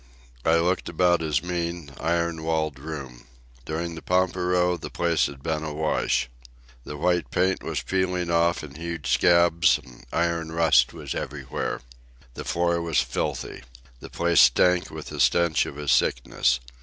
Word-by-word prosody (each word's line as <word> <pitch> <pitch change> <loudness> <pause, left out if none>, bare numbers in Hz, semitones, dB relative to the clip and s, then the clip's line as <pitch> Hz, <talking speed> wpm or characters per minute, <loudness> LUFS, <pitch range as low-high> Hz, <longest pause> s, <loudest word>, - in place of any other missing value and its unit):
I 80 - +3
looked 90 +2 +1
about 85 0 +2
his 75 -4 0
mean, 85 -3 -4
iron 85 -1 -1
walled 80 -3 -1
room. 70 -5 -8 0.4
During 85 +3 -3
the 80 - -8
pampero 90 -1 +1
the 85 - -7
place 85 -2 +1
had 70 -1 -11
been 80 -1 -2
awash. 75 -4 0 0.6
The 75 - -7
white 90 +1 0
paint 95 0 +1
was - - -3
peeling 90 -2 -1
off 85 0 +2
in 75 -2 -9
huge 85 0 -4
scabs, 85 -1 +4
and - - -16
iron 85 -1 -1
rust 80 -7 +4
was - - -6
everywhere. - - -4 0.5
The - - -7
floor 85 0 0
was 85 -2 -1
filthy. 60 -2 -3 0.4
The - - -10
place 85 -1 +3
stank 90 -1 +4
with - - -8
the - - -7
stench 85 -2 +3
of - - -8
his 75 -1 -1
sickness. - - +2
85 Hz, 155 wpm, -25 LUFS, 75-85 Hz, 0.6 s, scabs